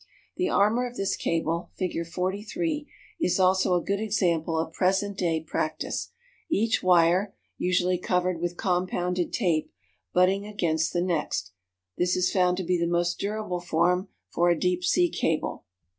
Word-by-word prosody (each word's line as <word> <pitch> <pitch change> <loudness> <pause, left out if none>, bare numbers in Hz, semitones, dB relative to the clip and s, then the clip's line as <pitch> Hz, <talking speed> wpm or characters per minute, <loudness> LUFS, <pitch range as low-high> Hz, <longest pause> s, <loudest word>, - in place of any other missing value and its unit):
The 365 0 0
armor 225 +5 +2
of 245 - -10
this 195 0 0
cable 165 +1 -1
(Fig. 170 -3 -2
43) 215 - -2 0.3
is 180 - +1
also 185 0 +3
a 175 - 0
good 200 0 -1
example 175 -7 0
of 160 0 -2
present 195 +3 +1
day 165 -4 0
practise, 160 - -3 0.4
each 225 -5 +1
wire 180 +2 +3 0.2
(usually 180 0 +1
covered 180 -1 0
with 175 0 -2
compounded 180 -1 -1
tape) 170 -8 0 0.4
butting 190 +3 +2
against 165 -6 0
the 175 - 0
next; 150 - -1 0.5
this 180 0 +2
is 185 0 +1
found 180 -1 +2
to 190 - -2
be 180 0 0
the 170 - +1
most 175 0 0
durable 205 -3 -2
form 180 +3 +1 0.2
for 175 +1 +1
a 170 - +3
deep 180 0 0
sea 355 - +3
cable. 165 - -2
180 Hz, 155 wpm, -26 LUFS, 170-195 Hz, 0.5 s, also